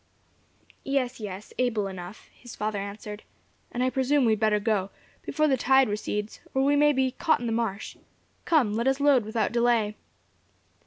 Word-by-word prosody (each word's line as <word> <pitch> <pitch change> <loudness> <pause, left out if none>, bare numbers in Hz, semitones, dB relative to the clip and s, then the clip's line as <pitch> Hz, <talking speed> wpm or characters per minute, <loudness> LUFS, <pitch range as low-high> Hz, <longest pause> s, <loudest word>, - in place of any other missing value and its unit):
"Yes, 265 -3 -1
yes, 205 -1 -7
able 235 -5 +1
enough," 190 +1 -8
his 245 -2 -12
father 210 -1 -2
answered. 210 +1 -7 0.5
"And, 245 - -1
I 255 - +1
presume, 265 +1 +2
we 225 - +4
had 215 - +1
better 215 -1 +2
go, 205 -3 0 0.3
before 305 0 0
the 270 -3 +2
tide 265 +1 +4
recedes, 210 0 -3 0.2
or 265 - +3
we 285 +1 +3
may 295 +1 +5
be 265 -2 +1
caught 320 +4 +1
in 245 - -5
the 230 - -1
marsh. 225 -3 -3 0.5
Come, 280 -11 +2
let 230 +4 0
us 270 +1 +2
load 280 -4 +4
without 220 +2 -1
delay." 235 -3 +2
235 Hz, 175 wpm, -26 LUFS, 210-265 Hz, 0.5 s, may